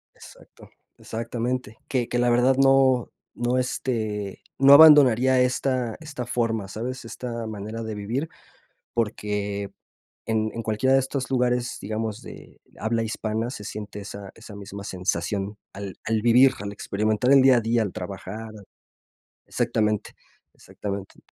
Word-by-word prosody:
Exacto. -, -, -16 dB, 0.3 s
Exactamente, 115 Hz, 0 st, -4 dB
que 125 Hz, -3 st, -1 dB
que 120 Hz, -, 0 dB
la 120 Hz, -, +3 dB
verdad 125 Hz, +2 st, +4 dB
no 135 Hz, -2 st, +4 dB, 0.3 s
no 120 Hz, +1 st, 0 dB
este, 110 Hz, -6 st, -2 dB, 0.2 s
no 140 Hz, +1 st, +7 dB
abandonaría 130 Hz, -5 st, +8 dB
esta 125 Hz, -2 st, 0 dB
esta 150 Hz, -6 st, -6 dB
forma, 115 Hz, -4 st, -1 dB
¿sabes?, 120 Hz, +4 st, -5 dB
esta 115 Hz, -1 st, -5 dB
manera 110 Hz, +2 st, -6 dB
de 110 Hz, -1 st, -5 dB
vivir, 120 Hz, +10 st, -3 dB, 0.6 s
porque 105 Hz, -3 st, -2 dB, 0.5 s
en 110 Hz, -1 st, 0 dB
en 115 Hz, -, -4 dB
cualquiera 110 Hz, +5 st, +1 dB
de -, -, +6 dB
estos 135 Hz, 0 st, -3 dB
lugares, 125 Hz, -1 st, 0 dB
digamos, 110 Hz, +1 st, -4 dB
de -, -, -12 dB, 0.2 s
habla 115 Hz, +1 st, 0 dB
hispana, 110 Hz, +1 st, -2 dB
se 105 Hz, -, -8 dB
siente 105 Hz, 0 st, -7 dB
esa 100 Hz, -1 st, -8 dB
esa 115 Hz, -2 st, -12 dB
misma 100 Hz, 0 st, -8 dB
sensación 95 Hz, +2 st, -2 dB, 0.2 s
al 100 Hz, -1 st, -7 dB
al 110 Hz, -1 st, 0 dB
vivir, 125 Hz, +3 st, +6 dB
al 100 Hz, 0 st, -5 dB
experimentar 110 Hz, +5 st, 0 dB
el 135 Hz, -1 st, +7 dB
día 130 Hz, -2 st, +6 dB
a -, -, +1 dB
día, 115 Hz, +1 st, +1 dB
al 100 Hz, -, -3 dB
trabajar 100 Hz, +4 st, -7 dB, 1.0 s
exactamente. 105 Hz, -1 st, 0 dB, 0.4 s
Exactamente. 100 Hz, -1 st, -7 dB
115 Hz, 140 wpm, -24 LUFS, 105-125 Hz, 1.0 s, abandonaría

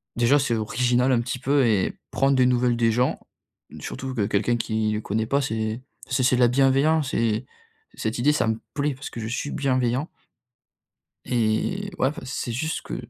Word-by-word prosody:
déjà, 120 Hz, +5 st, +4 dB
c'est 125 Hz, -4 st, 0 dB
original 125 Hz, +3 st, +1 dB
un 120 Hz, -2 st, +3 dB
petit 125 Hz, +1 st, -4 dB
peu 135 Hz, +1 st, +2 dB
et 105 Hz, -4 st, 0 dB
prendre 135 Hz, 0 st, +2 dB
des 130 Hz, -1 st, +4 dB
nouvelles 125 Hz, -1 st, +2 dB
des 115 Hz, -1 st, +3 dB
gens, 125 Hz, +3 st, +1 dB, 0.6 s
surtout 130 Hz, 0 st, -6 dB
que 105 Hz, -5 st, +1 dB
quelqu'un 105 Hz, +4 st, +1 dB
qui 110 Hz, -1 st, -1 dB
le 105 Hz, 0 st, -2 dB
connaît 110 Hz, +1 st, -1 dB
pas, 140 Hz, +4 st, +1 dB
c'est 110 Hz, -2 st, -2 dB, 0.3 s
c'est 130 Hz, 0 st, +1 dB
c'est 130 Hz, 0 st, +4 dB
de -, -, +1 dB
la 120 Hz, -, +7 dB
bienveillance, 135 Hz, +4 st, +2 dB
et 115 Hz, +1 st, 0 dB, 0.5 s
cette 110 Hz, +1 st, -3 dB
idée, 140 Hz, +5 st, +3 dB
ça 150 Hz, -, +1 dB
me 110 Hz, 0 st, 0 dB
plaît 145 Hz, -1 st, 0 dB
parce 135 Hz, -, -8 dB
que -, -, -8 dB
je 110 Hz, -, -4 dB
suis 120 Hz, +5 st, -3 dB
bienveillant. 130 Hz, +1 st, 0 dB, 1.2 s
Et 120 Hz, -, 0 dB
ouais, 130 Hz, -, +3 dB
enfin, 150 Hz, -, -8 dB
c'est 125 Hz, -1 st, -4 dB
juste 155 Hz, +7 st, -2 dB
que -, -, -6 dB
125 Hz, 190 wpm, -24 LUFS, 115-135 Hz, 1.2 s, la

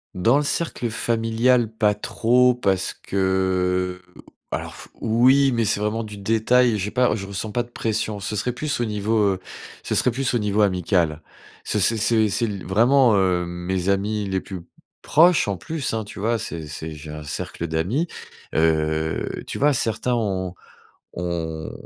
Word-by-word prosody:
Dans 115 Hz, +9 st, +3 dB
le 150 Hz, -, +1 dB
cercle 145 Hz, -5 st, -1 dB
familial, 115 Hz, +1 st, +1 dB
pas 110 Hz, -2 st, +2 dB
trop 125 Hz, +4 st, +2 dB
parce 95 Hz, -6 st, 0 dB
que, 90 Hz, -1 st, 0 dB, 0.5 s
alors -, -, -4 dB
f -, -, -11 dB
oui, 130 Hz, +5 st, +4 dB
mais 115 Hz, -2 st, +1 dB
c'est 105 Hz, -, +1 dB
vraiment 110 Hz, +2 st, -1 dB
du 105 Hz, -1 st, -8 dB
détail, 115 Hz, +3 st, +2 dB
j'ai 105 Hz, +3 st, -3 dB
pas 125 Hz, +1 st, +2 dB
je 100 Hz, -2 st, -6 dB
ressens 100 Hz, +2 st, -4 dB
pas 120 Hz, -, 0 dB
de 120 Hz, -, -17 dB
pression. 110 Hz, -3 st, -2 dB
Ce 105 Hz, -, -3 dB
serait 125 Hz, +4 st, -1 dB
plus 145 Hz, 0 st, -2 dB
au 120 Hz, -, +1 dB
niveau, 110 Hz, +1 st, -1 dB, 0.2 s
heu, -, -, -9 dB, 0.4 s
ce -, -, -2 dB
serait 125 Hz, -, +3 dB
plus 130 Hz, +2 st, -1 dB
au 120 Hz, -, +3 dB
niveau 105 Hz, 0 st, +1 dB
amical. 90 Hz, -5 st, +1 dB, 0.4 s
Ce -, -, -1 dB
c'est 110 Hz, +5 st, +3 dB
c'est 110 Hz, 0 st, +2 dB
c'est 115 Hz, +4 st, 0 dB
l 100 Hz, -4 st, -5 dB
vraiment, 120 Hz, +4 st, +4 dB
heu, 90 Hz, -2 st, +2 dB
mes 90 Hz, +2 st, -3 dB
amis 100 Hz, +1 st, 0 dB
les 95 Hz, -, 0 dB
plus 95 Hz, -1 st, -8 dB, 0.4 s
proches, 170 Hz, -1 st, +4 dB
en 100 Hz, -, -2 dB
plus, 155 Hz, -, -4 dB
hein, 110 Hz, -1 st, -1 dB
tu 100 Hz, -, -10 dB
vois? 115 Hz, +3 st, 0 dB
C'est 85 Hz, -8 st, -6 dB
c'est 80 Hz, +1 st, -6 dB
j'ai 75 Hz, 0 st, -9 dB
un 75 Hz, 0 st, -7 dB
cercle 80 Hz, +3 st, -5 dB
d'amis. 90 Hz, -, -1 dB, 0.5 s
Heu, 80 Hz, 0 st, +1 dB, 0.2 s
tu -, -, -5 dB
vois, 145 Hz, +1 st, +4 dB
certains 115 Hz, +1 st, 0 dB
ont 95 Hz, -5 st, -2 dB, 0.6 s
ont, 80 Hz, -2 st, -4 dB
105 Hz, 175 wpm, -23 LUFS, 90-120 Hz, 0.6 s, oui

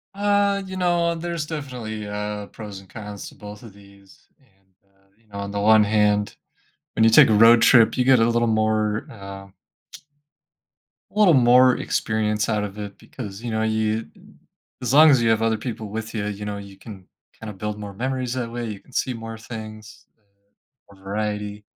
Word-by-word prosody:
Uh, 200 Hz, 0 st, +1 dB
you 190 Hz, 0 st, -7 dB
know, 175 Hz, -2 st, +1 dB
there's 170 Hz, -1 st, -4 dB
definitely, 125 Hz, -9 st, -6 dB
uh, 105 Hz, 0 st, -4 dB
pros 105 Hz, -3 st, -9 dB
and 95 Hz, -, -17 dB
cons 105 Hz, 0 st, -9 dB
to -, -, -13 dB
both 105 Hz, +1 st, -11 dB
of 110 Hz, -4 st, -12 dB
these, 100 Hz, -1 st, -20 dB
and, 95 Hz, -7 st, -34 dB, 0.2 s
uh, 95 Hz, 0 st, -34 dB
you 115 Hz, 0 st, -33 dB
know, 100 Hz, -1 st, -9 dB
on 100 Hz, 0 st, -5 dB
the 100 Hz, -, -3 dB
one 110 Hz, +1 st, +5 dB
hand, 105 Hz, -1 st, +1 dB, 0.6 s
when 110 Hz, -, +2 dB
you 115 Hz, -, +5 dB
take 115 Hz, -, +7 dB
a -, -, +3 dB
road 115 Hz, +2 st, +6 dB
trip, 115 Hz, -1 st, +5 dB
you 125 Hz, -, +1 dB
get 130 Hz, 0 st, +5 dB
a 115 Hz, 0 st, +3 dB
little 120 Hz, 0 st, +1 dB
more, 110 Hz, -1 st, 0 dB
uh 100 Hz, -3 st, -10 dB, 1.6 s
a 210 Hz, -, -5 dB
little 195 Hz, -5 st, +6 dB
more 125 Hz, -1 st, +5 dB
experience 110 Hz, 0 st, -1 dB
out 105 Hz, -2 st, 0 dB
of 105 Hz, 0 st, -7 dB
it 100 Hz, -1 st, -7 dB
because, 105 Hz, -4 st, -9 dB
you 120 Hz, -, -4 dB
know, 110 Hz, 0 st, -1 dB
you 110 Hz, 0 st, 0 dB
d -, -, -22 dB, 0.6 s
as 125 Hz, +1 st, -2 dB
long 155 Hz, +2 st, +8 dB
as 135 Hz, -4 st, +4 dB
you 115 Hz, -, +2 dB
have 110 Hz, -1 st, +2 dB
other 115 Hz, -1 st, +1 dB
people 110 Hz, -2 st, -6 dB
with 110 Hz, +2 st, -6 dB
ya, 105 Hz, -2 st, -3 dB
you 105 Hz, 0 st, -5 dB
know, 105 Hz, -1 st, -4 dB
you 100 Hz, -1 st, -11 dB
can 95 Hz, -2 st, -12 dB, 0.3 s
kinda 110 Hz, -2 st, -7 dB
build 105 Hz, +2 st, -5 dB
more 100 Hz, -1 st, -7 dB
memories 130 Hz, +3 st, -3 dB
that 120 Hz, -3 st, -4 dB
way, 120 Hz, 0 st, -4 dB
you 105 Hz, -2 st, -7 dB
can -, -, -23 dB
see 130 Hz, 0 st, -1 dB
more 115 Hz, -1 st, -8 dB
things, 110 Hz, -1 st, -10 dB
uh, -, -, -41 dB, 0.7 s
more 95 Hz, -, -22 dB
variety. 105 Hz, +1 st, -4 dB
110 Hz, 200 wpm, -22 LUFS, 105-120 Hz, 1.6 s, long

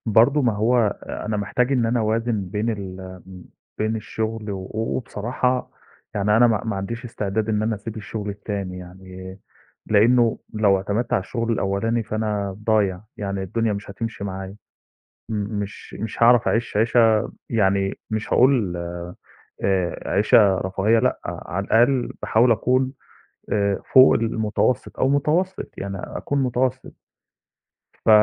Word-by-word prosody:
برضه 120 Hz, +7 st, +4 dB
ما 120 Hz, -3 st, +3 dB
هو 110 Hz, +1 st, +2 dB
أنا 105 Hz, 0 st, -4 dB
محتاج 125 Hz, +6 st, 0 dB
إن 125 Hz, -4 st, +2 dB
أنا 120 Hz, +1 st, +1 dB
أوازِن 110 Hz, -1 st, 0 dB
بين 105 Hz, +4 st, -1 dB
ال 100 Hz, -4 st, -5 dB, 0.3 s
م 90 Hz, -1 st, -11 dB, 0.3 s
بين 110 Hz, +1 st, 0 dB
الشُغل 110 Hz, 0 st, -4 dB
و 95 Hz, -1 st, -6 dB
وبصراحة 120 Hz, +3 st, -1 dB, 0.4 s
يعني 105 Hz, +1 st, +2 dB
أنا 120 Hz, +1 st, +6 dB
ما 110 Hz, -3 st, +1 dB
ما 110 Hz, -3 st, -2 dB
عنديش 115 Hz, +5 st, -5 dB
استعداد 110 Hz, -2 st, -2 dB
إن 105 Hz, -1 st, +1 dB
أنا 110 Hz, +1 st, 0 dB
أسيب 110 Hz, +2 st, -7 dB
الشُغل 105 Hz, 0 st, -5 dB
التاني 100 Hz, -2 st, -5 dB
يعني 95 Hz, +1 st, -10 dB, 0.5 s
لإنّه 115 Hz, +2 st, +4 dB, 0.2 s
لو 105 Hz, -2 st, +4 dB
اعتمدت 105 Hz, +5 st, -2 dB
على -, -, +3 dB
الشُغل 115 Hz, +4 st, -2 dB
الأولاني، 115 Hz, +3 st, 0 dB
فأنا 105 Hz, -3 st, -2 dB
ضايع، 100 Hz, -5 st, +2 dB, 0.2 s
يعني 100 Hz, -1 st, -3 dB
الدنيا 115 Hz, +4 st, -1 dB
مش 100 Hz, 0 st, -6 dB
هتمشي 110 Hz, 0 st, -5 dB
معايا 95 Hz, 0 st, -6 dB, 0.7 s
م 110 Hz, -, -2 dB, 0.2 s
مش 100 Hz, 0 st, -7 dB
مش 110 Hz, +2 st, -2 dB
هاعرف 120 Hz, 0 st, +6 dB
أعيش 115 Hz, -2 st, 0 dB
عيشة 115 Hz, 0 st, +3 dB, 0.2 s
يعني 100 Hz, -3 st, +1 dB
مش 110 Hz, 0 st, -2 dB
هاقول 120 Hz, -9 st, +3 dB, 0.9 s
آآ، 95 Hz, -3 st, 0 dB
عيشة 100 Hz, -1 st, +4 dB
رفاهية 95 Hz, +4 st, +2 dB
لأ، 125 Hz, +2 st, +1 dB
على 90 Hz, +3 st, -4 dB
الأقل 120 Hz, +2 st, +3 dB
باحاول 115 Hz, +2 st, +3 dB
أكون 130 Hz, +3 st, +2 dB, 0.6 s
آآ، 100 Hz, -1 st, +1 dB
فوق 130 Hz, 0 st, +8 dB
المتوسط 110 Hz, +1 st, 0 dB
أو 130 Hz, -, +3 dB
متوسط، 160 Hz, +7 st, 0 dB
يعني 100 Hz, 0 st, -4 dB
أكون 140 Hz, -1 st, -2 dB
متوسط. 125 Hz, 0 st, -1 dB, 1.2 s
ف -, -, +1 dB
110 Hz, 140 wpm, -23 LUFS, 100-115 Hz, 1.2 s, فوق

